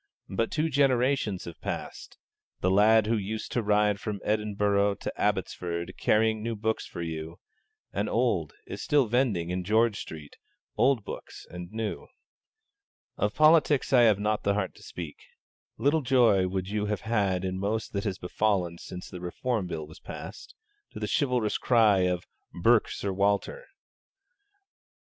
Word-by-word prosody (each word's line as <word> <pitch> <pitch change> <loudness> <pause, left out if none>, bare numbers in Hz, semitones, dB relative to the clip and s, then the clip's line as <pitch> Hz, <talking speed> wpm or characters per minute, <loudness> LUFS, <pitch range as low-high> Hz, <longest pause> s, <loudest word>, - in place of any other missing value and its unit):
But 115 +4 -1
two 160 0 0
generations 130 - +1
have 85 - -10
passed; - - -6 0.4
the 90 - +2
lad 105 +2 +5
who 115 +2 +1
used 110 +2 -4
to 120 - 0
ride 105 -1 +2
from 105 -1 -4
Edinburgh 105 -1 +1
to - - -5
Abbotsford, 90 -4 -2
carrying 110 0 +2
new 115 +1 -2
books 110 +1 -2
for 85 - -6
you, 80 0 -5 0.6
and - - -1
old, - - +1
is - - -7
still 145 -3 +3
vending, 110 -8 0
in 90 0 -2
George 110 +2 +2
Street, 75 -2 -9 0.4
old 125 -5 +2
books - - -8
and 90 +1 -8
new. 110 -1 -4 1.1
Of - - -1
politics 155 -3 +4
I 125 - +7
have 110 -4 +5
not 105 +1 0
the 100 0 +1
heart 95 -2 -2
to - - -18
speak. 80 -4 -8 0.6
Little 150 +3 +2
joy 120 -8 +4
would 95 0 -3
you 105 +1 -1
have 105 -2 -2
had 100 -5 0
in 95 0 -2
most 105 +3 -2
that 100 +1 -2
has 95 -4 -2
befallen 90 -2 -1
since 90 - -8
the 90 - -9
Reform 105 +3 -2
Bill 80 -3 -4
was 80 - -14
passed, - - -9 0.4
to - - -7
the - - -2
chivalrous 125 -7 +1
cry 105 -6 +4
of 90 -1 -2 0.3
'burke 115 +4 +4
Sir 100 -1 -3
Walter.' 100 - 0
105 Hz, 160 wpm, -28 LUFS, 95-115 Hz, 1.1 s, I